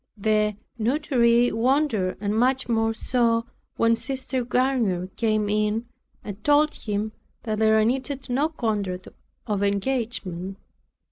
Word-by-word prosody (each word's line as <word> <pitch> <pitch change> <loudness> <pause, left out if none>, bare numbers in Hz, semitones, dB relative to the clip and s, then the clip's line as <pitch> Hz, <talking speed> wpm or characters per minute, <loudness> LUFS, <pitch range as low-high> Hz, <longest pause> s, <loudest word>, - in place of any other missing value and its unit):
The 210 0 +1 0.2
notary 240 -1 +3
wondered 230 -5 +1
and 205 +1 -1
much 255 +3 +2
more 225 -1 +1
so 230 0 +1 0.3
when 230 0 +4
Sister 260 0 -3
Garnier 235 -8 0
came 215 -2 +1
in, 210 +2 0 0.4
and 205 0 -8
told 295 +1 +4
him, 210 0 -3 0.3
that 215 -2 -2
there 220 0 +4
needed 265 +3 -2
no 275 +5 +1
contract 205 - -3 0.4
of 205 -2 -1
engagement. 200 -3 -2
225 Hz, 120 wpm, -24 LUFS, 210-255 Hz, 0.4 s, when